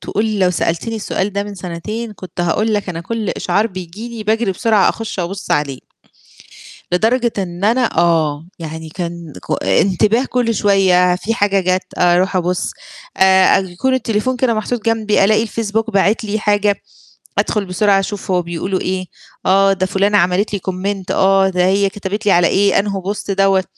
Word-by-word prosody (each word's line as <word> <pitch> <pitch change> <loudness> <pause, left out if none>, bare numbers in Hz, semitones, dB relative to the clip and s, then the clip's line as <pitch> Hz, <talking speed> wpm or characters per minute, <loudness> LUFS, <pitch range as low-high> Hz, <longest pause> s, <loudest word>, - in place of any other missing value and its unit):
تقول 215 0 -2
لو 185 -2 +3
سألتيني 175 +6 -2
السؤال 205 -2 -2
ده 200 +1 -1
من 205 0 -7
سنتين 200 +6 -5
كنت 185 -2 -8
هاقول 215 +6 +1
لك 205 -2 -2
أنا 170 -2 -4
كلّ 220 +3 -4
إشعار 200 +5 0
بييجي 185 +2 -8
لي 230 -2 -7
باجري 220 -1 +1
بسرعة 215 0 +2
أخش 225 -4 -3
أبُصّ 190 +3 -5
عليه. 140 -3 0 1.1
لدرجة 235 +6 +2
إن 180 -1 -4
أنا 230 -2 +1
آه 160 -3 +2
يعني 160 -1 -7
كان 170 -1 -6
ك 85 - -3
انتباه 200 - +2
كلّ 245 -3 0
شوية 185 -3 +3
في 220 +5 -2
حاجة 200 -3 +2
جات 185 0 0
أروح 180 +2 +3
أبُصّ، 180 0 -1 0.5
آآ 190 0 +5
أ - - +1
يكون 190 +8 -1
التليفون 250 0 -1
كان 245 -2 +1
محطوط 215 +1 -3
جنبي 215 -3 +2
ألاقي 215 +2 +3
الفيسبوك 225 0 -2
باعِت 205 +2 +2
لي 215 +1 -2
حاجة، 205 -1 +1 0.6
أدخل 210 -2 0
بسرعة 195 +2 +2
أشوف 195 0 -5
هو 180 -1 +2
بيقولوا 175 +3 -3
إيه، 185 0 -2 0.4
آه 195 +1 +4
ده 185 -1 0
فلانة 200 +2 +2
عملت 180 +4 +1
لي 200 - -2
Comment 190 +1 -3
آه 195 0 +4
ده 180 -1 +1
هي 195 +1 +2
كتبت 205 +2 -5
لي 200 - +5
على 175 0 +4
إيه 200 +3 +3
أنهو 195 -1 -2
Post 205 - -7
دوّة، 195 -1 +3
195 Hz, 175 wpm, -17 LUFS, 180-215 Hz, 1.1 s, آآ